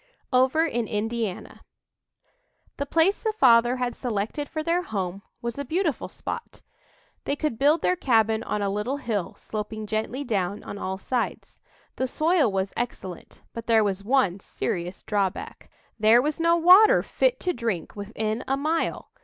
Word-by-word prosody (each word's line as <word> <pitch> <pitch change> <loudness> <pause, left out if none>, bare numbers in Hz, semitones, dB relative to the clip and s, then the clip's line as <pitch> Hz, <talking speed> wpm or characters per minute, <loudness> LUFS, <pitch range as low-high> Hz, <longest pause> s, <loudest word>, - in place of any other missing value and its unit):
OVER 260 +6 +4
IN 240 -8 -1
INDIANA 220 -2 -3 1.2
The 280 - -3
place 330 +7 +3
the 440 -2 -1
father 240 - +5
had 250 -1 -2
selected 235 +4 -3
for 310 -1 -3
their 340 +2 +1
home 195 - -4 0.2
was 235 +3 -3
a - - -1
beautiful 320 +1 -1
spot. 470 - -7 0.6
They 280 - 0
could 290 -6 -2
build 295 +4 +3
their 365 - +3
cabin 225 - +2
on 210 -2 -2
a 200 - 0
little 210 +7 -2
hill, 215 -9 -3
sloping 215 0 -5
gently 220 +6 -2
down 200 -5 -2
on 205 - -7
all 190 0 -3
sides. 245 +4 -3 0.4
The 260 - 0
soil 310 - +2
was 195 0 -2
excellent, 190 -7 -6
but 230 0 -7
there 225 -2 +5
was 200 -1 -1
one 205 -6 +2
serious 180 -1 -4
drawback 200 -3 -2 0.3
there 220 +2 +6
was 295 +5 -1
no 335 +1 +4
water 365 +6 +7
fit - - +1
to 360 - 0
drink 225 -8 -3
within 215 +2 -3
a 270 - +1
mile! 310 +4 -1
235 Hz, 160 wpm, -25 LUFS, 210-290 Hz, 1.2 s, water